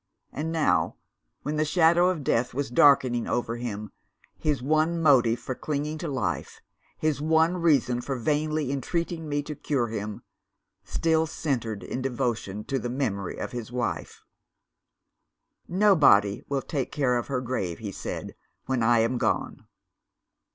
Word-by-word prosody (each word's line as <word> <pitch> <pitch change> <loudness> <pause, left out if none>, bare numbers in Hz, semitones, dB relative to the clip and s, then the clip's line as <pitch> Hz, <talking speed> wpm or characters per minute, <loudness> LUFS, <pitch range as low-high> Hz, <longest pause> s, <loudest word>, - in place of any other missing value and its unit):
And 160 +3 -3
now, 90 - +1 0.5
when 150 +1 -2
the 155 - +3
shadow 170 +3 +4
of 170 -6 -2
death 120 -1 0
was 140 -2 -2
darkening 125 -2 +4
over 120 -1 -1
him, 105 -3 -5 0.5
his 150 -3 0
one 155 +5 +1
motive 125 -7 +4
for 130 - -4
clinging 150 +3 -3
to 170 - -4
life, 135 -4 -3 0.4
his 155 -2 0
one 160 +3 +3
reason 135 -8 +2
for 135 +2 -3
vainly 150 +2 0
entreating 165 +3 -2
me 145 0 -1
to 150 - -5
cure 135 -5 -1
him, 105 -1 -5 0.6
still 160 -1 +1
centred 120 -10 -3
in 130 - -4
devotion 120 -6 -2
to 135 +2 -2
the 120 - -4
memory 115 -8 -2
of - - -4
his 120 -2 -6
wife. 120 -2 -3 1.4
'Nobody 155 - +4
will 140 -1 -1
take 140 -5 -3
care 135 -4 +1
of 120 - -2
her 135 -2 -1
grave,' 115 -9 -3
he 105 -3 -6
said, - - -6 0.3
'when 130 -2 0
I 115 0 +4
am 120 +2 0
gone. - - -1
135 Hz, 150 wpm, -26 LUFS, 120-155 Hz, 1.4 s, shadow